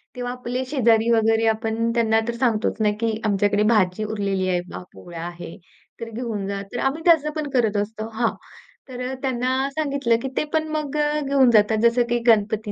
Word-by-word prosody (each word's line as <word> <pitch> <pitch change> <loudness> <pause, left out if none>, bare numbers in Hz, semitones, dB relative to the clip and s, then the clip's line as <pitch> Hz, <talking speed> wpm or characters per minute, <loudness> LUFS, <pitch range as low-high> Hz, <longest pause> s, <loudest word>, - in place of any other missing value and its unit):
तेव्हा 245 0 -4
आपले 250 +1 -4
शेजारी 235 -4 +2
वगैरे, 225 0 +3
आपण 225 +1 0
त्यांना 225 -2 +2
तर 235 - -1
सांगतोच 235 -3 0
ना, 210 -1 +3
की 225 -1 -1
आमच्याकडे 205 0 +2
भाजी 190 -1 +1
उरलेली 200 -3 -2
आहे 180 -1 +1
बा, - - -8
पोळ्या 170 -2 -9
आहे, 175 -1 -9 0.4
तर 230 -1 -6
घेऊन 225 -4 -4
जा. 200 0 -3
तर 245 - -3
आम्ही 270 +6 -1
त्याच 330 -4 +5
पण 305 -2 -3
करत 225 -5 +1
असतो 215 +2 -3
हां, 230 +1 +1 0.6
तर 250 -1 -7
अ, - - -4
त्यांना 260 +1 -1
सांगितलं, 280 -5 +1
की 265 - -3
ते - - +2
पण 315 0 +1
मग 300 -1 -4
अ, 300 0 +1
घेऊन 275 -2 +3
जातात. 215 0 +4
जसं 235 +1 +4
की 240 0 +1
गणपती 215 -1 +2
230 Hz, 195 wpm, -22 LUFS, 215-255 Hz, 0.6 s, त्याच